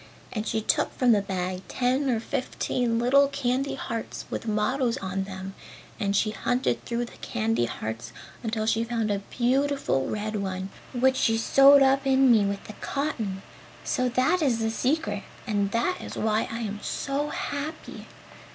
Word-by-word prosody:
And 215 Hz, -1 st, -3 dB
she 220 Hz, -, 0 dB
took -, -, 0 dB
from 250 Hz, -2 st, +4 dB
the 210 Hz, -3 st, +4 dB
bag 185 Hz, -1 st, -3 dB
ten 260 Hz, +2 st, +1 dB
or 235 Hz, -3 st, +2 dB
fifteen 240 Hz, 0 st, -1 dB
little 270 Hz, +4 st, +5 dB
candy 275 Hz, 0 st, -1 dB
hearts 230 Hz, -2 st, -5 dB
with -, -, -4 dB
mottos 230 Hz, +3 st, +1 dB
on 190 Hz, 0 st, -3 dB
them 190 Hz, 0 st, -7 dB, 0.5 s
and 200 Hz, -2 st, 0 dB
she 215 Hz, +1 st, +2 dB
hunted 245 Hz, +4 st, 0 dB
through 240 Hz, 0 st, -2 dB
the -, -, -14 dB
candy 115 Hz, +2 st, 0 dB
hearts 110 Hz, +1 st, -5 dB, 0.3 s
until 220 Hz, -1 st, -2 dB
she 225 Hz, +1 st, +2 dB
found 230 Hz, -2 st, -1 dB
a 200 Hz, -, 0 dB
beautiful 265 Hz, -, +1 dB
red 215 Hz, 0 st, -2 dB
one 190 Hz, -1 st, -3 dB, 0.2 s
which 260 Hz, +1 st, +2 dB
she 225 Hz, 0 st, +2 dB
sewed 275 Hz, +4 st, +7 dB
up 270 Hz, 0 st, +3 dB
in 265 Hz, -1 st, +5 dB
me 220 Hz, -3 st, +5 dB
with 200 Hz, 0 st, -2 dB
the 215 Hz, -, -9 dB
cotton! 225 Hz, -10 st, -2 dB, 0.4 s
So 255 Hz, -1 st, 0 dB
that 255 Hz, +9 st, +2 dB
is 260 Hz, -6 st, +2 dB
the 225 Hz, -1 st, 0 dB
secret, 300 Hz, +8 st, 0 dB, 0.2 s
and 205 Hz, -3 st, 0 dB
that 235 Hz, -, 0 dB
is -, -, -7 dB
why 220 Hz, 0 st, +1 dB
I 230 Hz, +1 st, -4 dB
am 210 Hz, -2 st, -4 dB
so 280 Hz, +2 st, -2 dB
happy! 295 Hz, +3 st, -5 dB
230 Hz, 170 wpm, -26 LUFS, 205-265 Hz, 0.5 s, sewed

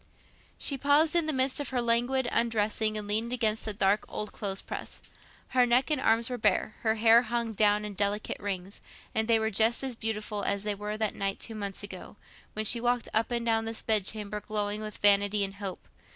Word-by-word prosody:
She 275 Hz, -2 st, -1 dB
paused 295 Hz, +4 st, +3 dB
in 335 Hz, -2 st, +3 dB
the -, -, +2 dB
midst 260 Hz, 0 st, +1 dB
of 285 Hz, -, -3 dB
her 255 Hz, -, -1 dB
languid 240 Hz, +2 st, +1 dB
undressing 220 Hz, -1 st, 0 dB
and 210 Hz, -1 st, -5 dB
leaned 220 Hz, +3 st, 0 dB
against 220 Hz, -3 st, 0 dB
the 215 Hz, -, -1 dB
dark 200 Hz, 0 st, +1 dB
old 210 Hz, -, -4 dB
clothes 195 Hz, -3 st, -3 dB
press. -, -, -7 dB, 0.5 s
Her 255 Hz, -1 st, +3 dB
neck 250 Hz, +5 st, +2 dB
and 295 Hz, -3 st, +1 dB
arms 225 Hz, 0 st, +3 dB
were 250 Hz, -1 st, -4 dB
bare, 215 Hz, 0 st, +1 dB
her 220 Hz, -1 st, +1 dB
hair 225 Hz, +1 st, +6 dB
hung 235 Hz, -1 st, -2 dB
down 210 Hz, 0 st, +2 dB
in 210 Hz, -, -6 dB
delicate 205 Hz, +2 st, -2 dB
rings—and 200 Hz, +2 st, -5 dB
they 230 Hz, -1 st, +4 dB
were 220 Hz, 0 st, -1 dB
just 225 Hz, +5 st, +2 dB
as 265 Hz, -2 st, -2 dB
beautiful 215 Hz, -2 st, -3 dB
as 200 Hz, 0 st, -1 dB
they 210 Hz, 0 st, -1 dB
were 210 Hz, +1 st, -5 dB
that 215 Hz, -1 st, -1 dB
night 195 Hz, 0 st, -2 dB
two 225 Hz, -, -3 dB
months 200 Hz, -2 st, -4 dB
ago, 195 Hz, -1 st, -8 dB, 0.4 s
when 215 Hz, 0 st, -2 dB
she 230 Hz, +2 st, +2 dB
walked 245 Hz, -1 st, 0 dB
up 220 Hz, +1 st, +1 dB
and 235 Hz, -1 st, -2 dB
down 225 Hz, -1 st, +1 dB
this 225 Hz, 0 st, -4 dB
bed 215 Hz, -3 st, +2 dB
chamber 210 Hz, +1 st, -4 dB
glowing 210 Hz, 0 st, -2 dB
with 215 Hz, -1 st, -6 dB
vanity 205 Hz, 0 st, +4 dB
and 195 Hz, 0 st, -4 dB
hope. 195 Hz, -3 st, -6 dB
220 Hz, 210 wpm, -29 LUFS, 205-235 Hz, 0.5 s, hair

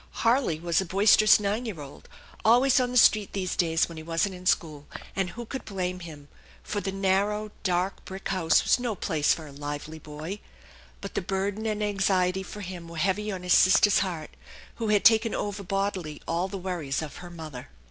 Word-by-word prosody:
Harley 230 Hz, -, +2 dB
was 170 Hz, +2 st, +1 dB
a -, -, -4 dB
boisterous 205 Hz, +3 st, +5 dB
nine 210 Hz, +3 st, -1 dB
year 195 Hz, -8 st, -5 dB
old, 140 Hz, -1 st, -11 dB, 0.3 s
always 250 Hz, +4 st, +5 dB
on 250 Hz, -1 st, +1 dB
the 250 Hz, -, -1 dB
street 215 Hz, -3 st, +5 dB
these 185 Hz, -2 st, -2 dB
days 165 Hz, -2 st, +2 dB
when 165 Hz, -, -10 dB
he 160 Hz, -, -7 dB
wasn't 165 Hz, +4 st, -1 dB
in 180 Hz, 0 st, -7 dB
school; 150 Hz, -5 st, 0 dB, 0.3 s
and 190 Hz, -2 st, 0 dB
who 240 Hz, +6 st, -8 dB
could 265 Hz, +4 st, -6 dB
blame 185 Hz, -2 st, -3 dB
him? 155 Hz, -5 st, -10 dB, 0.4 s
For 205 Hz, -, -3 dB
the 195 Hz, -, -3 dB
narrow, 200 Hz, +2 st, 0 dB
dark 185 Hz, 0 st, -1 dB
brick 190 Hz, +1 st, -7 dB
house 170 Hz, -4 st, +3 dB
was -, -, +3 dB
no 240 Hz, -3 st, -2 dB
place 155 Hz, -5 st, +1 dB
for 160 Hz, -, -1 dB
a 145 Hz, -, -11 dB
lively 145 Hz, +2 st, -6 dB
boy. 155 Hz, +7 st, -7 dB, 0.6 s
But 200 Hz, -, -7 dB
the -, -, -1 dB
burden 200 Hz, +3 st, -2 dB
and 215 Hz, -1 st, -1 dB
anxiety 190 Hz, -2 st, +1 dB
for 205 Hz, +2 st, -8 dB
him 180 Hz, -3 st, -7 dB
were 165 Hz, 0 st, -9 dB
heavy 200 Hz, +5 st, 0 dB
on 185 Hz, -2 st, -6 dB
his 180 Hz, -, +3 dB
sister's 195 Hz, +2 st, +5 dB
heart, 170 Hz, -6 st, -3 dB, 0.5 s
who 230 Hz, -, -2 dB
had 210 Hz, -1 st, +2 dB
taken 225 Hz, 0 st, +5 dB
over 205 Hz, 0 st, -3 dB
bodily 195 Hz, -5 st, -3 dB
all 170 Hz, +3 st, 0 dB
the 195 Hz, -, -6 dB
worries 170 Hz, -6 st, -3 dB
of 150 Hz, -, -8 dB
her 175 Hz, -, -9 dB
mother. 155 Hz, -7 st, -9 dB
190 Hz, 200 wpm, -27 LUFS, 165-205 Hz, 0.6 s, boisterous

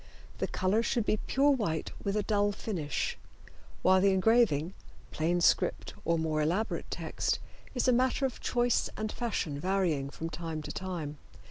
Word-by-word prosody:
The -, -, 0 dB
color 190 Hz, +4 st, +1 dB
should 235 Hz, -1 st, 0 dB
be 215 Hz, -, +2 dB
pure 280 Hz, +2 st, +4 dB
white 200 Hz, -, -1 dB
with 200 Hz, +1 st, 0 dB
a 210 Hz, -, +1 dB
dull 205 Hz, -1 st, +2 dB
finish, 165 Hz, -10 st, -3 dB, 0.6 s
while 185 Hz, 0 st, +5 dB
the 195 Hz, 0 st, +4 dB
engraving, 190 Hz, -5 st, +3 dB, 0.4 s
plain 175 Hz, +3 st, 0 dB
script -, -, +2 dB
or 170 Hz, 0 st, +2 dB
more 155 Hz, -1 st, 0 dB
elaborate 180 Hz, +9 st, -1 dB
text, -, -, -1 dB, 0.4 s
is 250 Hz, -, +1 dB
a 255 Hz, -, +5 dB
matter 255 Hz, +3 st, +2 dB
of 260 Hz, -, -3 dB
choice 240 Hz, -1 st, +1 dB
and 215 Hz, 0 st, -2 dB
fashion 180 Hz, -11 st, -2 dB
varying 175 Hz, -6 st, 0 dB
from 165 Hz, +3 st, -6 dB
time 160 Hz, -1 st, -4 dB
to -, -, -5 dB
time. 165 Hz, -6 st, -5 dB
190 Hz, 160 wpm, -30 LUFS, 160-225 Hz, 0.6 s, while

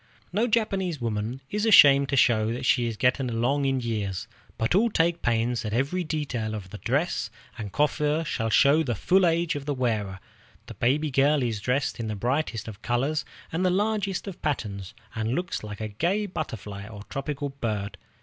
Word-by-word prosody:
No 220 Hz, +5 st, +2 dB
Japanese 195 Hz, -, 0 dB
woman 115 Hz, +2 st, -3 dB
is 210 Hz, +1 st, -1 dB
ashamed 140 Hz, -10 st, +7 dB
to -, -, +1 dB
show 115 Hz, -4 st, +3 dB
that 125 Hz, -, -4 dB
she 120 Hz, -1 st, +3 dB
is 115 Hz, -2 st, -4 dB
getting 125 Hz, +1 st, +2 dB
along 125 Hz, +5 st, +1 dB
in 135 Hz, -1 st, +1 dB
years, 105 Hz, -6 st, -3 dB, 0.3 s
but 110 Hz, -, 0 dB
all 220 Hz, +6 st, +4 dB
take 170 Hz, -3 st, +1 dB
pains 120 Hz, 0 st, +1 dB
that 105 Hz, -1 st, -4 dB
every 140 Hz, +10 st, 0 dB
detail 135 Hz, -9 st, -3 dB
of 95 Hz, -3 st, -8 dB
the 105 Hz, -, -8 dB
dress 135 Hz, -3 st, 0 dB, 0.3 s
and 105 Hz, -3 st, -6 dB
coiffure 150 Hz, +3 st, +1 dB
shall 115 Hz, -7 st, -1 dB
show 140 Hz, +8 st, +5 dB
the 125 Hz, -7 st, -1 dB
full 185 Hz, -, +3 dB
age 170 Hz, 0 st, +1 dB
of 145 Hz, -1 st, -5 dB
the 145 Hz, -, 0 dB
wearer. 105 Hz, -7 st, -1 dB, 0.5 s
The -, -, -9 dB
baby 145 Hz, +5 st, +1 dB
girl 140 Hz, +1 st, +3 dB
is 115 Hz, -4 st, -2 dB
dressed 130 Hz, +3 st, 0 dB
in 115 Hz, -, -3 dB
the 110 Hz, -, -3 dB
brightest 120 Hz, +1 st, -1 dB
of 110 Hz, -1 st, -9 dB
colors 135 Hz, +6 st, 0 dB, 0.3 s
and 165 Hz, +3 st, -1 dB
the 185 Hz, -, +3 dB
largest 200 Hz, 0 st, 0 dB
of 195 Hz, -, -7 dB
patterns, 100 Hz, -10 st, -3 dB, 0.2 s
and 110 Hz, +2 st, -1 dB
looks 175 Hz, -8 st, -3 dB
like 105 Hz, -1 st, -7 dB
a 110 Hz, -, -3 dB
gay 175 Hz, -, 0 dB
butterfly 105 Hz, -, -6 dB
or 105 Hz, -2 st, -9 dB
tropical 140 Hz, +5 st, -4 dB
bird. 110 Hz, -7 st, -4 dB
130 Hz, 190 wpm, -26 LUFS, 110-155 Hz, 0.5 s, ashamed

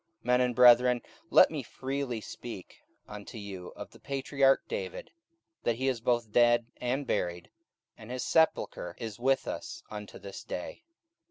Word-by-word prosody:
44:002:029 -, -, -34 dB
Men 125 Hz, 0 st, +4 dB
and 125 Hz, -1 st, +1 dB
brethren, 125 Hz, 0 st, +7 dB, 0.3 s
let -, -, +7 dB
me -, -, -3 dB
freely 135 Hz, -3 st, -4 dB
speak 110 Hz, -3 st, -9 dB, 0.3 s
unto 105 Hz, +2 st, -9 dB
you 95 Hz, -4 st, -7 dB
of 100 Hz, 0 st, -9 dB
the 115 Hz, -, -16 dB
patriarch 135 Hz, 0 st, +1 dB
David, 485 Hz, +1 st, -5 dB, 0.5 s
that 120 Hz, -, +1 dB
he 130 Hz, +3 st, -2 dB
is 125 Hz, -4 st, 0 dB
both 120 Hz, -2 st, 0 dB
dead 120 Hz, 0 st, +4 dB
and 130 Hz, +3 st, -1 dB
buried, 90 Hz, -6 st, -2 dB, 0.5 s
and 110 Hz, -, -11 dB
his 125 Hz, 0 st, -3 dB
sepulchre 160 Hz, -, +1 dB
is 110 Hz, -2 st, -6 dB
with 135 Hz, +2 st, +2 dB
us -, -, -6 dB
unto 105 Hz, -1 st, -7 dB
this 100 Hz, -1 st, -9 dB
day. 90 Hz, -, -6 dB
120 Hz, 160 wpm, -30 LUFS, 105-130 Hz, 0.5 s, brethren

